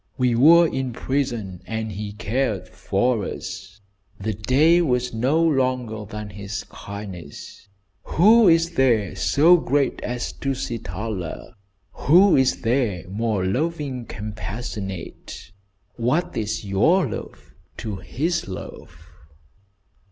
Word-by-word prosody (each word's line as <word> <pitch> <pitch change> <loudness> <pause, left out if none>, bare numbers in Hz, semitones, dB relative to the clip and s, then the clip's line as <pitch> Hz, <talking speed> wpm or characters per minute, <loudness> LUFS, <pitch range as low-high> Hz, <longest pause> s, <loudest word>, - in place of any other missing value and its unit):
We 125 -2 +2
were 165 +8 +7
in 130 -4 -3
prison 115 -9 -2
and 110 -1 -3
he 105 +1 -5
cared 110 0 -2
for 110 +2 0
us. 95 +1 -7 0.4
The 110 +2 -2
day 145 - +3
was 125 -6 0
no 130 +8 +1
longer 130 -7 0
than 105 0 -7
his 100 +1 -6
kindness. 95 -6 -9 0.4
Who 215 +5 +5
is 165 0 +4
there 120 - +2
so 165 +5 +5
great 145 -3 0
as 125 0 -3
Tusitala? 110 - -4 0.4
Who 180 +6 +5
is 130 -1 +2
there 115 -7 0
more 105 -1 -1
loving 135 - -2
compassionate? 100 -4 -6 0.5
What 155 +10 0
is 110 -1 -3
your 155 - +3
love - - -8 0.2
to 105 -3 -5
his 165 - -2
love?" 95 - -9
115 Hz, 110 wpm, -23 LUFS, 105-140 Hz, 0.5 s, were